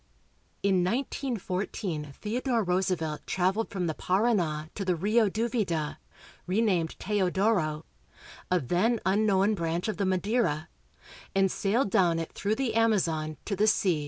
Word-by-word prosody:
In 190 -2 +3
19 245 +5 -1
14 180 -5 -3
Theodore 235 +2 0
Roosevelt 180 -4 -1
traveled 190 +5 0
from 185 -3 -2
the 160 - -1
Parana 180 -6 0
to 200 - -4
the 185 -2 +1
Rio 210 +5 +2
Duvida 210 -8 -1 0.5
(renamed 185 -4 +1
Teodoro), 190 -5 +1 0.6
a 180 - +3
then 185 - +1
unknown 200 +1 +3
branch 170 -1 -2
of 215 - -2
the 200 - 0
Madeira, 185 -4 0 0.7
and 195 -1 +3
sailed 205 +2 0
down 175 -5 +3
it 165 -1 -4
through 205 +2 -1
the 250 -2 -1
Amazon 175 -9 +1
to 200 - -1
the 210 +3 +2
sea. 185 -6 +2
190 Hz, 135 wpm, -28 LUFS, 170-215 Hz, 0.7 s, In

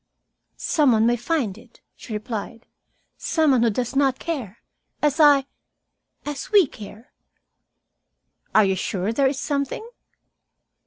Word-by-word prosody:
"Some 290 -6 +2
one 220 0 +3
may 240 +1 +3
find 240 - -2
it," 235 0 -20 0.2
she 230 - -9
replied. 220 +2 -5 0.5
"Some 315 -3 +2
one 255 -3 +3
who 235 - +4
does 245 +4 -3
not 270 -2 +2
care, 250 - -5 0.4
as 295 +1 0
I 290 -3 +6 0.8
as 290 -1 -6
we 405 -4 +6
care." 215 -1 -12 1.4
"Are 215 - +6
you 190 0 +1
sure 190 +2 -2
there 275 +3 +3
is 265 +1 -2
something?" 285 - -3
250 Hz, 135 wpm, -23 LUFS, 220-285 Hz, 1.4 s, I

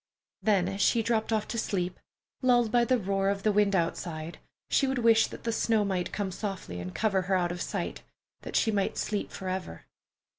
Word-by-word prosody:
Then 195 -3 +3
as 195 +1 -3
she 230 +2 +3
dropped 225 -1 0
off 215 -1 0
to 230 - -2
sleep, 180 -4 -2 0.4
lulled 245 -3 +3
by 240 -1 +4
the 255 +1 +3
roar 195 -2 0
of 200 0 -2
the 215 - +3
wind 205 -1 +3
outside, 165 -1 -2 0.3
she 275 - +2
would 265 0 0
wish 230 -2 +5
that - - -10
the 230 - 0
snow 220 -1 +2
might 185 -3 -1
come 200 -2 -2
softly 190 - -5
and 90 +1 -6
cover 200 -4 +2
her 190 - +4
out 175 -1 +1
of 175 0 -5
sight, - - -3 0.4
that - - -7
she 220 - +3
might 200 -2 0
sleep 210 -1 -2
forever. 185 - -5
200 Hz, 200 wpm, -29 LUFS, 185-225 Hz, 0.4 s, wish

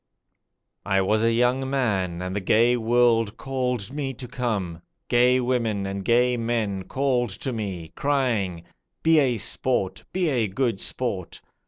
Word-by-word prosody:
I 95 -1 +2
was 110 +3 +1
a 115 - +3
young 125 +3 +1
man, 95 -10 -1
and 90 +1 -4
the - - 0
gay 115 +5 +3
world 115 -2 +2
called 125 -4 -3
me 135 -3 -3
to 125 +1 -8
come; 105 -10 -3 0.3
Gay 125 +1 +4
women 115 -5 0
and 95 0 -4
gay 125 +3 +3
men 110 -5 -1
called 130 -3 0
to 130 - -2
me, 95 -7 -5
crying: 115 -12 0 0.4
'Be 160 -1 +5
a 130 -5 +2
sport; 105 -1 -1
be 185 -2 0
a 120 -6 +1
good 115 0 -1
sport! 100 -9 -3
120 Hz, 150 wpm, -24 LUFS, 100-125 Hz, 0.4 s, Be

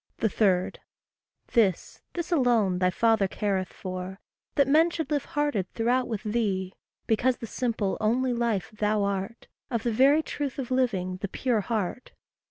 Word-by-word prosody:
3. 195 -4 +2 0.8
This, 200 -7 +1
this 345 0 -4
alone 235 - +3
thy 180 0 +3
father 220 +1 +2
careth 190 -1 -2
for 185 0 -6 0.4
That 280 -2 +4
men 315 +4 +5
should 320 -2 -4
live 290 -2 0
hearted 290 -11 -1
throughout 245 +2 +1
with 220 -4 -4
thee 200 -4 -1 0.3
Because 245 +3 +2
the - - -6
simple, 225 -4 -2
only 245 +4 +2
life 230 -7 -1
thou 210 -1 0
art, 200 +3 -3 0.2
Of 235 -3 -2
the 235 - 0
very 280 +7 +5
truth 285 -5 -4
of 260 -2 -4
living, 195 -8 0
the 200 - -4
pure 230 +2 0
heart. 220 +2 -3
225 Hz, 155 wpm, -27 LUFS, 195-255 Hz, 0.8 s, men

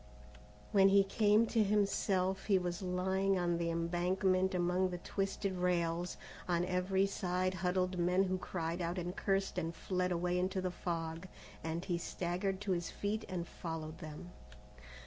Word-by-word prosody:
When 195 -1 +6
he 200 0 +6
came 210 +2 +4
to 225 -1 +2
himself, 195 -2 +1
he 200 -3 +5
was 180 +1 -2
lying 190 +1 +1
on 175 -1 +1
the 170 0 0
embankment 185 +3 +1
among 180 +1 +2
the 180 - -4
twisted 195 +1 -2
rails. 175 -1 0 0.3
On 175 -1 +1
every 185 +1 +1
side 185 -1 -1
huddled 185 0 0
men 180 +2 +3
who 185 -1 -1
cried 170 -1 -3
out 170 +2 -2
and 180 +1 -3
cursed 195 -2 0
and 165 -1 -3
fled 180 -1 -1
away 180 +1 +1
into 185 +1 0
the 185 -1 -1
fog, 165 0 -4 0.4
and 165 +2 -3
he 175 -3 -1
staggered 180 +3 -2
to 205 -2 -1
his 175 -2 -1
feet 215 +2 -2
and 175 -2 -3
followed 160 -1 -6
them. 155 +1 -8
180 Hz, 160 wpm, -35 LUFS, 175-190 Hz, 0.4 s, When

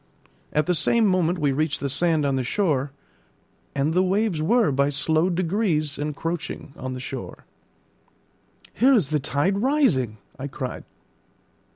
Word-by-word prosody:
At 150 0 +1
the 180 - +2
same 230 +6 +2
moment 185 -3 +2
we 145 -4 +1
reached 150 +1 0
the 140 - -2
sand 155 +2 +1
on 140 -1 +1
the 130 - 0
shore, 145 - 0 0.8
and 140 +3 +1
the 180 - +3
waves 190 -2 +1
were 220 +1 +3
by 140 +1 +2
slow 155 +4 +1
degrees 170 -5 0
encroaching 150 0 -4
on 130 0 -5
the 130 - -6
shore. 125 - -7 1.3
"Here 265 +3 +4
is 195 - +2
the 155 -1 +1
tide 145 +8 0
rising," 205 - +2 0.2
I 135 - -4
cried. 130 -2 -6
155 Hz, 150 wpm, -24 LUFS, 140-185 Hz, 1.3 s, Here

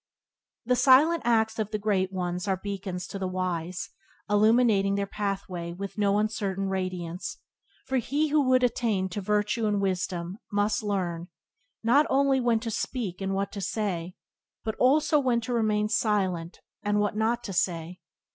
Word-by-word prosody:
The 250 +1 +3
silent 280 +6 +5
acts 225 -1 +2
of 215 -1 -1
the 215 - -2
Great 200 -3 0
Ones 180 0 -3
are 190 -1 +1
beacons 190 -2 -5
to 195 - -7
the 190 - -1
wise, 180 -1 -3 0.4
illuminating 210 -1 +4
their 200 0 0
pathway 195 -4 -4
with 195 +2 -6
no 200 -1 +3
uncertain 200 -2 -1
radiance, 185 -2 -4 0.5
for 265 - 0
he 290 +5 0
would 255 -4 +4
attain 225 -6 +1
to 205 +3 -4
virtue 210 +3 0
and 205 -1 +1
wisdom 185 -1 -2
must 205 0 +1
learn, 180 -5 -2 0.6
not 270 +7 +4
only 270 0 +3
when 240 -2 +2
to 230 -1 -3
speak 205 -5 -3
and 195 0 -1
what 200 0 -1
to 200 - -6
say, 185 -4 -2 0.5
but 220 - -2
also 295 +3 +4
when 250 -4 +2
to 245 +2 -3
remain 215 -2 +1
silent 190 -6 0 0.2
and 205 0 +1
what 205 0 0
not 230 +2 0
to 195 - -5
say. 175 0 -1
205 Hz, 160 wpm, -27 LUFS, 185-230 Hz, 0.6 s, silent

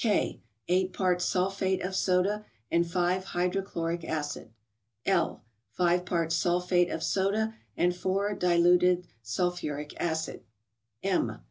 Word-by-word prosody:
K. 215 -3 +1 0.3
—Eight 185 +1 +2
parts 180 -1 +1
sulphate 190 0 0
of 190 +1 -3
soda, 190 +3 +2 0.3
and 170 0 +2
5 180 +1 +1
hydrochloric 175 -2 -2
acid. 150 -7 -3 0.6
L. - - +1 0.3
—Five 180 +2 +2
parts 165 -2 0
sulphate 180 +1 +2
of 165 - -3
soda, 210 +3 +1 0.2
and 180 0 +2
4 195 +3 0
diluted 180 0 +4 0.2
sulphur¬ 150 - -1
ic 150 0 -7
acid. 160 -1 -2 0.6
M. 195 -2 +1
180 Hz, 120 wpm, -29 LUFS, 170-190 Hz, 0.6 s, diluted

